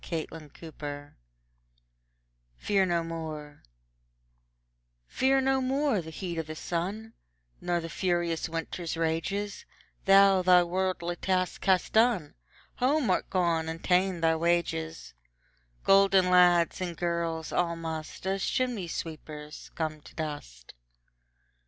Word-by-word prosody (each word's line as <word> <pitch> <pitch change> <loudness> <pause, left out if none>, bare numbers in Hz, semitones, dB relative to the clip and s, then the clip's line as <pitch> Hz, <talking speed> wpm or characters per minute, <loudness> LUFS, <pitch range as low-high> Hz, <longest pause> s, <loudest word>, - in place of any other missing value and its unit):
William 160 -1 -5
Shakespeare 145 -3 -8 1.4
Fear 195 -2 +1
No 170 -1 +1
More 155 -3 -7 1.4
Fear 265 - +2
no 265 0 +2
more 265 -4 +1
the 160 - -9
heat 170 0 -5
o' - - +2
the 155 0 -8
sun; 195 +8 -4 0.5
Nor 175 -1 0
the 165 - -5
furious 175 -1 -1
winter's 165 +1 -4
rages, 165 +6 -2 0.4
Thou 195 -1 +6
thy 180 -1 +6
worldly 175 -1 -2
task 185 -1 -1
hast 185 -2 +2
done, 220 -9 +3 0.4
Home 260 -3 +2
art - - 0
gone, 170 -3 +1
and 165 +1 -6
ta'en 185 -1 +2
thy 165 0 +3
wages; 165 -1 -1 0.7
Golden 195 -2 +5
lads 175 -1 +5
and 175 -3 -3
girls 170 -2 -2
all 170 -1 0
must, 160 0 -6
As 195 0 -1
chimney 245 -8 -1
sweepers 155 -2 -7
come 155 -2 -3
to - - -16
dust. 145 - -6
175 Hz, 120 wpm, -28 LUFS, 160-190 Hz, 1.4 s, Thou